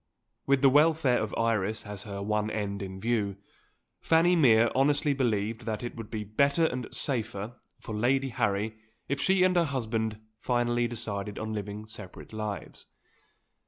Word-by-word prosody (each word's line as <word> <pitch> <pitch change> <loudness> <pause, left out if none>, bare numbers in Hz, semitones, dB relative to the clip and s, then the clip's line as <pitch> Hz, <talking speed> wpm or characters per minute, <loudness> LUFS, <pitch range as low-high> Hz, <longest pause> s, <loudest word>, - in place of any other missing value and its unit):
With 140 0 +3
the 135 - +8
welfare 150 -3 +4
of - - -3
Iris 110 -2 0
as 105 -2 -7
her 100 -1 -5
one 105 +1 0
end 100 -1 -3
in 95 -1 -6
view, 105 -3 0 0.6
Fanny 165 +2 +4
Mere 120 -7 +5
honestly 145 +2 +3
believed 115 -3 -1
that 110 +1 -2
it 120 - -5
would 115 -3 -8
be 110 -2 -4
better 140 +10 +2
and 125 -6 -2
safer 115 -3 -2 0.2
for 110 - -7
Lady 130 +5 +1
Harry 105 -1 0 0.3
if 140 0 -1
she 190 -1 +4
and 185 0 +3
her 175 - +5
husband 110 -5 -2 0.2
finally 120 -1 +1
decided 105 -3 -4
on 110 0 -4
living 105 0 -5
separate 110 -2 -10
lives. 110 -2 -5
115 Hz, 160 wpm, -29 LUFS, 105-135 Hz, 0.6 s, the